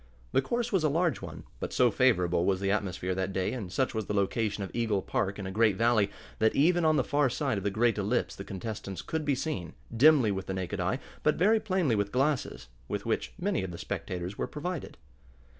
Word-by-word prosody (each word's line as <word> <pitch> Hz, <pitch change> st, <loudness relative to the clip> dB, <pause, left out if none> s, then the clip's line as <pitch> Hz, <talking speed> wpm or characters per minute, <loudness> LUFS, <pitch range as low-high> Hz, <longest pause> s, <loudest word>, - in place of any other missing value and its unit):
The 135 Hz, -, +3 dB
course 235 Hz, -, -2 dB
was 190 Hz, -6 st, +2 dB
a 155 Hz, -, +3 dB
large 165 Hz, -, +1 dB
one, -, -, -8 dB, 0.2 s
but -, -, -4 dB
so 125 Hz, -2 st, +4 dB
favorable 90 Hz, -9 st, +3 dB
was 95 Hz, 0 st, +1 dB
the 100 Hz, 0 st, 0 dB
atmosphere 95 Hz, -3 st, -1 dB
that 95 Hz, +1 st, -2 dB
day, 95 Hz, +2 st, -1 dB
and 105 Hz, -8 st, -5 dB
such 130 Hz, +7 st, 0 dB
was 110 Hz, -3 st, -3 dB
the 105 Hz, -, -2 dB
location 105 Hz, +1 st, 0 dB
of 95 Hz, -, -6 dB
Eagle 110 Hz, -5 st, 0 dB
Park 95 Hz, +1 st, -1 dB
in 100 Hz, -, -5 dB
a 95 Hz, -, -4 dB
great 105 Hz, 0 st, +3 dB
valley, 115 Hz, -1 st, +3 dB, 0.3 s
that 110 Hz, 0 st, +3 dB
even 175 Hz, +4 st, +4 dB
on 155 Hz, -1 st, +4 dB
the 135 Hz, -, +3 dB
far 145 Hz, +1 st, +2 dB
side 130 Hz, -4 st, -1 dB
of -, -, -8 dB
the 100 Hz, -, +1 dB
great 110 Hz, +2 st, +1 dB
ellipse 105 Hz, +5 st, 0 dB
the 100 Hz, -, -7 dB
contestants 100 Hz, -2 st, -6 dB
could 160 Hz, -1 st, -3 dB
be 145 Hz, -2 st, +2 dB
seen, 95 Hz, -, -4 dB, 0.2 s
dimly 135 Hz, -3 st, +6 dB
with 95 Hz, -1 st, -4 dB
the 95 Hz, -, -2 dB
naked 95 Hz, +1 st, -3 dB
eye, 90 Hz, +8 st, 0 dB, 0.2 s
but 150 Hz, -, +3 dB
very 215 Hz, +6 st, +4 dB
plainly 185 Hz, -, +1 dB
with 100 Hz, -1 st, -1 dB
glasses, 125 Hz, -, 0 dB, 0.2 s
with -, -, -3 dB
which -, -, -1 dB
many 190 Hz, -, 0 dB
of 95 Hz, -, -4 dB
the 85 Hz, -, -7 dB
spectators 90 Hz, +3 st, -5 dB
were -, -, -1 dB
provided. 165 Hz, +1 st, -5 dB
110 Hz, 225 wpm, -29 LUFS, 95-145 Hz, 0.3 s, dimly